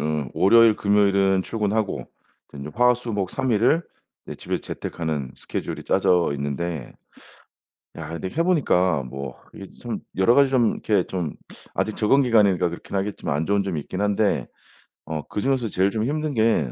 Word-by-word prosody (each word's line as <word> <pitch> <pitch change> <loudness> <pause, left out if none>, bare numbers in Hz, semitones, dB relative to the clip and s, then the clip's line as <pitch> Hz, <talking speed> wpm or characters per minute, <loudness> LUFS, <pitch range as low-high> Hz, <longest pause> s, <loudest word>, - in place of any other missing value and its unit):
어 75 -3 -2
월요일, 115 +2 +5
금요일은 100 -2 +3
출근하고 105 0 -2 0.5
이제 70 +1 -7
화, 125 +1 +4
수, 120 -1 -6
목 100 -3 -2
3 130 -1 -2
일을 120 +10 +3 0.4
네 - - -7
집에서 - - -4
재택하는 75 -6 -4
스케줄이 - - -5
짜져 90 -3 +2
있는데 70 +1 -4 1.0
야 80 -2 -7
근데 85 +3 -5
해 165 - 0
보니까 95 - +2
뭐 65 +1 -7 0.2
이게 - - -9
참 - - -4 0.2
여러 95 +5 +4
가지 140 0 +5
좀 125 -4 +3
이렇게 100 -5 0
좀 90 -5 -4 0.4
아직 110 - -1
적응 135 +6 +3
기간이니까 105 -8 +3
그렇긴 85 +3 -7
하겠지만 95 -6 -2
안 80 +2 -1
좋은 100 0 +2
점이 95 -6 -3
있긴 95 +6 -6
한데 105 0 +1 0.6
어 80 -1 -4
그중에서 125 0 -1
제일 95 +1 +2
좀 110 0 -1
힘든 150 +2 -2
게 110 - +2
100 Hz, 330 characters per minute, -23 LUFS, 85-115 Hz, 1.0 s, 월요일